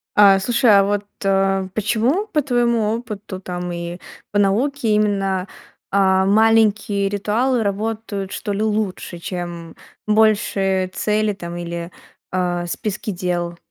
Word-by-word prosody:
А, 195 -2 +7
слушай, 235 +3 +2
а 200 -1 +7
вот, 205 0 -1 0.2
э, 195 -1 +1
почему, 240 - 0
по 305 -7 +1
твоему 235 -4 +1
опыту 210 -5 -7
там 180 -1 -5
и 170 0 -5 0.3
по 205 - 0
науке, 230 +6 +1
именно, 195 -3 +1 0.4
а, 190 -1 +3
маленькие 210 -1 +3
ритуалы 225 +4 0
работают, 205 -1 -3
что 205 - -3
ли, 205 - -2
лучше, 210 -5 -2
чем 175 -1 -6 0.3
большие 205 -3 +2
цели 210 +2 0
там 175 -2 -7
или, 170 0 -5 0.4
а, 175 -1 -1
списки 210 +4 -4
дел? 175 -1 -2
200 Hz, 125 wpm, -20 LUFS, 185-215 Hz, 0.4 s, А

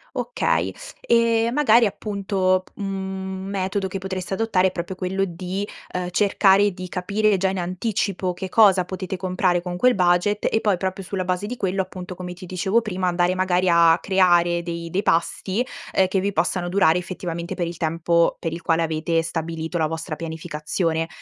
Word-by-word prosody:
Okay, - - 0 0.3
e 230 -1 +2
magari 245 -5 +5
appunto 195 -3 0
p - - -23
mhmm, 190 -1 -4 0.2
un - - -6
metodo 195 0 -1
che 190 - -4
potreste 190 0 -4
adottare 190 -3 +2
è - - -2
proprio 175 +1 -5
quello 185 +1 -1
di, 185 +2 -3 0.3
uhm, 180 0 -2
cercare 200 +1 +4
di 180 0 -8
capire 200 +3 +1
già 190 +1 +1
in 190 - -3
anticipo 185 0 -2
che 185 +1 -6
cosa 195 -3 +5
potete 185 +1 -5
comprare 180 -1 0
con 175 0 -5
quel 250 +6 +4
budget 180 +3 +2
e 220 - +2
poi 210 -3 +2
proprio 190 +1 -3
sulla 185 0 -3
base 180 +2 -1
di 240 +4 -4
quello 195 -4 -1
appunto, 185 -1 -7
come 180 0 -6
ti 180 +1 -11
dicevo 190 +5 +1
prima, 190 -4 -2
andare 175 +1 +1
magari 185 0 +1
a 170 -1 +6
creare 175 -3 +3
dei 170 -1 -5
dei 185 +4 0
pasti, 190 +5 0 0.3
ehm, 190 - +4
che 190 +1 0
vi 200 +2 -1
possano 175 +1 0
durare 180 -2 +3
effettivamente 175 -2 -5
per 175 -2 -2
il 170 0 -6
tempo 165 +1 +1
per 165 - -4
il 165 +1 -6
quale 165 -1 +1
avete 165 +1 0
stabilito 165 0 -3
la 160 -2 +1
vostra 160 -1 -5
pianificazione. 160 +1 -2
185 Hz, 185 wpm, -23 LUFS, 175-195 Hz, 0.3 s, a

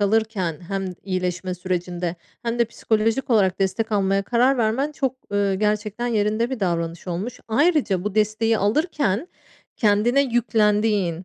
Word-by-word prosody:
alırken 205 -5 +1
hem 195 -1 -2 0.2
iyileşme 185 -1 -2
sürecinde 180 -1 -3 0.3
hem 235 0 -2
de 235 - +4
psikolojik 225 +3 -1
olarak 195 -4 +3
destek 215 +3 -1
almaya 195 -1 +2
karar 245 +5 +2
vermen 245 +7 +1
çok, 265 -3 -1 0.2
ııı, 200 -1 +1
gerçekten 210 +3 -1
yerinde 220 +1 +1
bir 260 -5 -4
davranış 170 -1 -2
olmuş. 190 +8 -4
Ayrıca 260 - +2
bu 210 -1 -3
desteği 220 +1 +2
alırken 285 - 0 0.5
kendine 225 +5 +3
yüklendiğin, 210 -7 +1
210 Hz, 135 wpm, -23 LUFS, 190-235 Hz, 0.5 s, de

